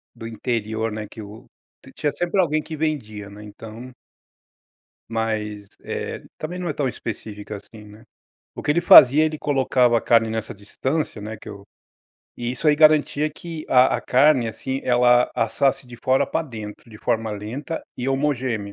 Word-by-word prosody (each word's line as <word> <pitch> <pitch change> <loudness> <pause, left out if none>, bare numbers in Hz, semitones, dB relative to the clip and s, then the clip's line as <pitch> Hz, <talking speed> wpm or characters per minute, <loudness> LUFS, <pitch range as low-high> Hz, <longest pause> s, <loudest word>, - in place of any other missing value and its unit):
do 115 - -8
interior, 110 -1 -2
né, 105 -1 -5
que 110 - -10
o 110 +5 -12 0.5
tinha 150 -2 -1
sempre 175 +2 -1
alguém 155 -2 +1
que 160 - -7
vendia, 110 -10 -3
né, 105 +1 -12
então 110 +4 -10 1.2
Mas, 105 -2 -3 0.2
eh, - - -5 0.2
também 175 +4 -5
não 180 - -3
é 150 - -1
tão 140 -3 -1
específica 105 -3 -6
assim, 105 +1 -14
né. 105 +1 -15 0.5
O - - -7
que - - -1
ele 170 +3 +3
fazia 150 -2 +8
ele 155 0 -1
colocava 130 -4 +2
a - - -6
carne 115 -1 +3
nessa 110 -1 -4
distância, 125 +5 -3
né, 110 +1 -6
que 110 - -12
eu 100 -1 -10 0.7
e 120 +1 -3
isso 140 +5 -4
aí 150 - +4
garantia 155 -1 +4
que 160 +1 -8
a 125 0 +5
a - - -5
carne, 130 -2 +3
assim, 130 +4 -4
ela 125 0 +4
assasse 135 +2 0
de 120 -1 -11
fora 130 +2 +2
pra 165 - -1
dentro, 110 -5 -9
de 110 - -12
forma 115 -1 -1
lenta 120 +10 -5
e 125 +2 -3
homogênea. 130 -7 -1
120 Hz, 175 wpm, -22 LUFS, 110-145 Hz, 1.2 s, fazia